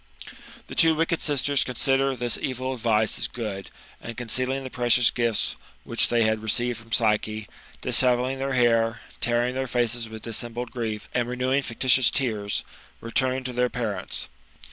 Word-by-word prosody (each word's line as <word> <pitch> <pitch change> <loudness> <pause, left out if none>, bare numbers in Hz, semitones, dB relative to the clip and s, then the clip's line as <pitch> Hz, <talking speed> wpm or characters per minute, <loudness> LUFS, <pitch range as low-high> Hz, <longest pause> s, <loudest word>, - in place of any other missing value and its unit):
The - - -10
two 165 -1 +4
wicked 165 +1 0
sisters 145 -1 +2
consider 135 +1 +1
this 120 -1 0
evil 130 0 -2
advice 110 -3 +1
as - - +1
good, 105 -5 -6 0.3
and 115 - -8
concealing 130 +3 +1
the 130 - -7
precious 120 -1 +4
gifts 115 -3 0 0.3
which - - +2
they 120 -1 +3
had 110 0 +1
received 120 +2 0
from 115 0 -17
Psyche, 110 -1 +1 0.3
dishevelling 125 +1 +2
their 135 0 -2
hair, 115 -2 +2 0.2
tearing 120 +1 +1
their 130 0 -2
faces 120 -1 -1
with 110 0 -9
dis 115 -2 -1
sembled 120 0 -6
grief, 110 -3 -4
and 120 -1 0
renewing 130 +2 0
fictitious 130 0 +3
tears, 110 -7 -1 0.4
returned 130 +2 -1
to 125 - -4
their 125 0 +1
parents. 110 -7 -3
120 Hz, 160 wpm, -25 LUFS, 115-130 Hz, 0.4 s, two